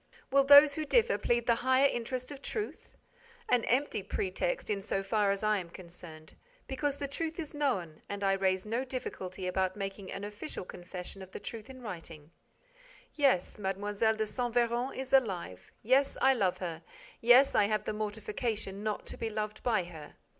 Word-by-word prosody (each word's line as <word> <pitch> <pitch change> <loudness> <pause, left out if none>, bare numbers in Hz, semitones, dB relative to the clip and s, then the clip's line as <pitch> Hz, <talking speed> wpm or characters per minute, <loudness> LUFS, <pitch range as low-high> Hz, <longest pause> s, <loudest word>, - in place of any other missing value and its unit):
Will 275 +1 +5
those 285 +1 +9
who 310 - -2
differ 475 - +3
plead 240 0 +1
the 235 - +4
higher 260 +2 +4
interest 255 +1 -3
of 280 -1 -9
truth? 425 +5 -5 0.5
An 245 -2 +3
empty 255 -2 +1
pretext 350 - -2
in 200 -1 -1
so 195 -1 -2
far 205 +1 +1
as 200 +1 0
I 215 -1 +2
am 175 -2 -8
concerned, 170 -3 -12 0.3
because 280 +1 -2
the 280 - -3
truth 320 +4 -3
is 315 -2 -5
known 195 - -1
and 200 0 -4
I 195 0 +3
raise 190 0 +1
no 230 +4 -1
difficulty 190 -8 -5
about 185 0 0
making 195 -1 -5
an 195 - -5
official 210 +2 -5
confession 180 +2 -7
of 190 0 -11
the - - -5
truth 220 +3 -7
in 260 -1 -11
writing. 165 -6 -8 0.8
Yes, 270 - +2
Mlle. 200 +1 -2 0.2
de 220 0 -1
Saint 240 +2 -3
Véran 240 +2 +1
is 265 0 -5
alive. 190 - +1
Yes, 265 +5 +3
I 265 0 +5
love 195 -8 +1
her. 170 -3 -5 0.4
Yes, 245 +4 +7
I 210 - +4
have 215 +1 0
the - - -3
mortification 210 -1 -3
not 215 -1 -3
to - - -3
be 225 - -2
loved 215 0 -4
by 220 -6 +1
her. 160 -4 -11
215 Hz, 180 wpm, -31 LUFS, 190-260 Hz, 0.8 s, those